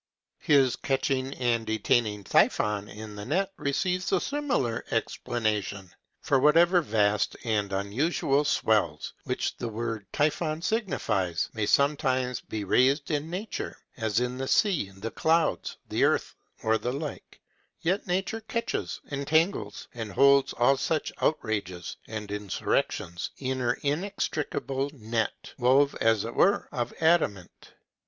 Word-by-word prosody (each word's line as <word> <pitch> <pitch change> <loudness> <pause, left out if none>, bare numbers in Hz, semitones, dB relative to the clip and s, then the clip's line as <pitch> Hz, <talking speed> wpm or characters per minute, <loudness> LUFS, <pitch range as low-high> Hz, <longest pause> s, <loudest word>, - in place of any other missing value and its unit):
His 135 -4 +4
catching 135 -1 0
and 120 -2 +1
detaining 110 -1 +1
Typhon 105 +2 +2
in 105 0 -9
the 100 - -6
net 185 - 0
receives 180 +6 -1
a - - +3
similar 265 - -1
explanation; 105 -5 -2 0.3
for 135 - +2
whatever 170 +5 +5
vast 105 -6 +1
and 105 -4 0
unusual 135 - +1
swells, 105 - +1
which - - -2
the 120 - -3
word 115 -2 -4
typhon 155 +2 0
signifies, 105 - 0
may 110 -2 -1
sometimes 130 -3 +2
be 110 -1 -5
raised 135 - +2
in 150 +1 -1
nature, 195 +5 -5 0.2
as 110 -2 0
in 125 +1 -2
the 135 - -2
sea, 180 - +2
the 95 +4 -7
clouds, 165 +1 +1
the - - 0
earth, - - +2 0.3
or 110 0 +2
the 125 - -2
like, 145 +1 -6 0.4
yet 185 +5 0
nature 190 +5 -1
catches, 230 +2 -3
entangles, 155 +6 0
and 115 -3 -5
holds 140 +4 +5
all 125 +3 +3
such 155 +2 -1
outrages 100 - -1
and 105 -2 -6
insurrections 100 -3 -2
in 130 -1 -2
her 120 -1 0
inextricable 145 -4 -2
net, 110 -2 -3
wove, 135 +3 +4
as 115 -2 +3
it 115 - -5
were, 200 - +3
of 120 -1 -2
adamant. 155 - 0
130 Hz, 130 wpm, -27 LUFS, 110-155 Hz, 0.4 s, whatever